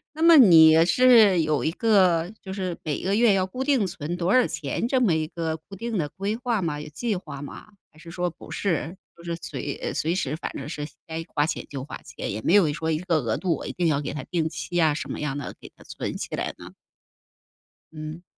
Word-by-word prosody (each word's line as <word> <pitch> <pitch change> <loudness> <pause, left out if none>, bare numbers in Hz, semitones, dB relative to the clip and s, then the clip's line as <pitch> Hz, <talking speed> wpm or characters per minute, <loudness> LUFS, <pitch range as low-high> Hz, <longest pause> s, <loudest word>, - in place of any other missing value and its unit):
那 315 - -6
么 335 0 +8
你 165 - +8
是 220 -5 +6
有 155 -5 0
一 160 - +1
个 185 -5 +3
就 190 - -7
是 185 -3 -3
每 150 -2 -3
个 195 +2 0
月 230 -1 +4
要 190 -1 +2
固 250 +8 -4
定 265 -8 +2
存 170 0 -5
多 180 +5 +1
少 255 - +5
钱， 160 - -3
这 260 +1 +2
么 210 -10 +3
一 155 -1 -1
个 160 -1 -3
固 180 +5 -13
定 230 +1 -3
的 150 -5 -1
规 200 +6 -3
划 235 -3 -1
吗？ 160 -4 -2
有 150 - -8
计 215 +8 -2
划 140 -6 -7
吗？ 145 - -9 0.2
还 155 - -23
是 165 +1 -12
说 180 0 -1
不 170 - -13
是， 170 -2 -2 0.2
就 170 - -15
是 170 -1 -3
随 145 -2 -5
呃， - - -3
随 160 +2 0
时 150 -6 -2
反 160 - -5
正 140 +1 -6
是 150 -2 -4 0.2
该 165 0 -4
花 145 - +2
钱 - - -4
就 135 -3 -6
花 140 - -8
钱， - - -6
也 105 +3 -4
没 165 - +1
有 190 -7 +5
说 160 +1 -2
一 155 - 0
个 175 -2 0
额 115 -7 -1
度， 170 -1 0
我 - - -8
一 - - -4
定 175 -2 0
要 145 -2 +1
给 150 - -4
它 150 - -5
定 165 -3 -1
期 175 +2 -3
啊， 160 -3 +4
什 145 - -5
么 - - -5
样 150 -2 -2
的， 145 - -6
给 - - -13
它 - - -17
存 - - -5
起 - - -5
来 - - -3
呢？ - - -11 1.2
嗯。 155 +2 -7
170 Hz, 265 characters per minute, -25 LUFS, 155-195 Hz, 1.2 s, 么